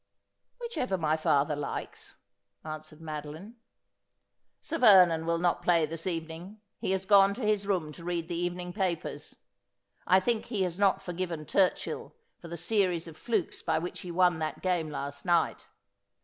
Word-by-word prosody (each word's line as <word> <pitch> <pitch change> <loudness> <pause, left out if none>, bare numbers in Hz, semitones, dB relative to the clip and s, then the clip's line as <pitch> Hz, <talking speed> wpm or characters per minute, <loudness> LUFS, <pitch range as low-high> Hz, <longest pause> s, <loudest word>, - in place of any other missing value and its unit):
' - - -53
Whichever 255 - -2
my 155 -2 +1
father 150 -1 +2
likes,' 145 -1 -6 0.5
answered 155 0 -8
Madoline. 155 +8 -7 0.5
' - - -52 0.3
Sir 330 - -4
Vernon 180 -8 +6
will 170 0 +2
not 175 0 +1
play 170 -3 +3
this 165 +3 -5
evening. 165 +4 -5 0.2
He - - -2
has 190 0 0
gone 200 0 +6
to 245 - -4
his 210 -2 +1
room 175 -6 0
to 170 - -12
read 170 -1 -2
the 175 - -4
evening 175 +1 -3
papers. 185 -5 -3 0.7
I 185 - +6
think 225 +3 0
he 215 -5 0
has 180 0 -3
not 195 -1 +3
forgiven 175 -3 -4
Turchill 190 +4 0 0.3
for 170 - -10
the 170 +1 -6
series 180 -3 0
of 165 - -10
flukes 215 0 -2
by 160 - 0
which 175 +3 -4
he 180 - -8
won 175 -1 +3
that 155 -2 -4
game 175 -4 0
last 140 -1 -5
night. 175 -2 +1
175 Hz, 170 wpm, -29 LUFS, 160-190 Hz, 0.7 s, Vernon